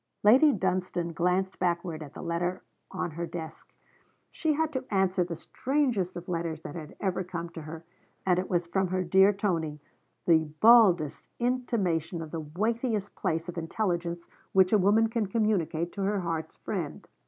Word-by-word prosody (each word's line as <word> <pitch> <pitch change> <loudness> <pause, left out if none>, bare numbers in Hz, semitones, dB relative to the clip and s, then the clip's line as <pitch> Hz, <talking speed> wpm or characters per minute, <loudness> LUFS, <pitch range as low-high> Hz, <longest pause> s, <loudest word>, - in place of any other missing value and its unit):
Lady 260 +9 +7
Dunstane 180 -4 -1
glanced 180 +3 0
backward 170 -2 -1
at 145 -1 -10
the - - -7
letter 175 +2 -2 0.3
on 185 -2 -3
her 170 +2 -4
desk. 165 -2 -8 0.6
She 315 -2 0
had 315 +1 0
to 260 -1 -2
answer 190 -2 +2
the 170 -1 -5
strangest 245 - -1
of 175 - -8
letters 165 -3 -3
that 145 - -7
had 155 -3 -8
ever 190 -1 -1
come 170 -1 -5
to 165 - -8
her, 160 +2 -9 0.4
and 180 -1 +3
it 185 - -3
was 175 -2 +1
from 190 +2 0
her 185 +1 -1
dear 190 +3 +5
Tony, 170 -7 -1 0.5
the 160 -2 +4
baldest 195 -10 +5
intimation 200 -10 0
of 160 -2 -7
the 165 - -3
weightiest 210 - -1
piece 165 +2 -1
of 175 -1 -4
intelligence 170 -1 -2 0.3
which 190 +1 +5
a 210 - +6
woman 210 +4 +4
can 225 -2 -1
communicate 185 -6 0
to 200 - -5
her 200 0 0
heart's 165 -2 -4
friend. - - -5
180 Hz, 170 wpm, -28 LUFS, 170-205 Hz, 0.6 s, Lady